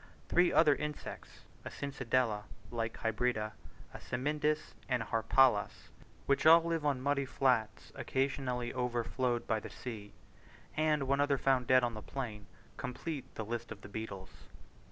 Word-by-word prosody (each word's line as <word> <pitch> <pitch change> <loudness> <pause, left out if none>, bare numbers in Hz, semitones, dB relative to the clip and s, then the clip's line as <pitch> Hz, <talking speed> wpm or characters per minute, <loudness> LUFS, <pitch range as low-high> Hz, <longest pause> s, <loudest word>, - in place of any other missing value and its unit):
Three 175 0 +4
other 155 -2 +6
insects 150 +1 -6 0.2
(a - - -5
Cincindela, 125 -6 -1 0.3
like 115 -1 -3
hybrida, 115 -1 0 0.4
a - - -8
Cymindis, 150 +4 -1 0.2
and 125 -3 +1
a - - -10
Harpalus, 115 -1 +2 0.4
which 140 +2 +3
all 165 +1 +9
live 165 -2 -1
on 140 -3 +1
muddy 140 0 +1
flats 125 -5 0
occasionally 130 -3 -1
overflowed 125 0 -1
by 110 -1 +1
the - - -8
sea), 110 -5 -8 0.6
and 155 -1 +2
one 140 +1 +2
other 145 -1 +2
found 130 -2 +2
dead 130 0 +5
on 120 -1 0
the 110 - -6
plain, 110 -7 -6 0.3
complete 135 +3 -5
the 110 - -4
list 115 +1 -4
of 100 -2 -8
the 100 - -10
beetles. 100 -3 -6
125 Hz, 150 wpm, -33 LUFS, 115-140 Hz, 0.6 s, all